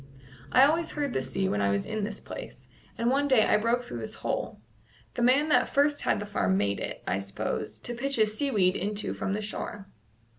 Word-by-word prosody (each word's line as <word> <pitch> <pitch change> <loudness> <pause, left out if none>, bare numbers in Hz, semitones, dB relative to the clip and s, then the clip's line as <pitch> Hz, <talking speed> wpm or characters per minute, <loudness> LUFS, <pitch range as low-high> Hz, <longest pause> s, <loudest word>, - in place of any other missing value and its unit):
"I 255 - +7
always 325 +3 +1
heard 285 -3 -2
the - - 0
sea 160 +9 -2
when 105 - 0
I 100 - +2
was 100 0 0
in 215 -1 -3
this 205 0 -4
place, - - -9 0.3
and 235 +1 +1
one 285 +2 +2
day 260 -6 +5
I - - +4
broke 230 +3 +1
through 120 - -6
this 110 - -4
hole. - - -2 0.5
The - - -3
man 265 +6 +4
that 300 - +3
first 290 +1 +2
had - - +1
the 210 - -4
farm 95 - +1
made 100 0 0
it, - - -5
I 95 - 0
s'pose, 100 0 -4
to 240 - -5
pitch 275 +4 0
his 215 -1 +2
seaweed 210 -8 +2
into 205 +2 -2
from 195 - -2
the 215 +1 -2
shore." 205 -1 -5
215 Hz, 220 wpm, -28 LUFS, 185-265 Hz, 0.5 s, I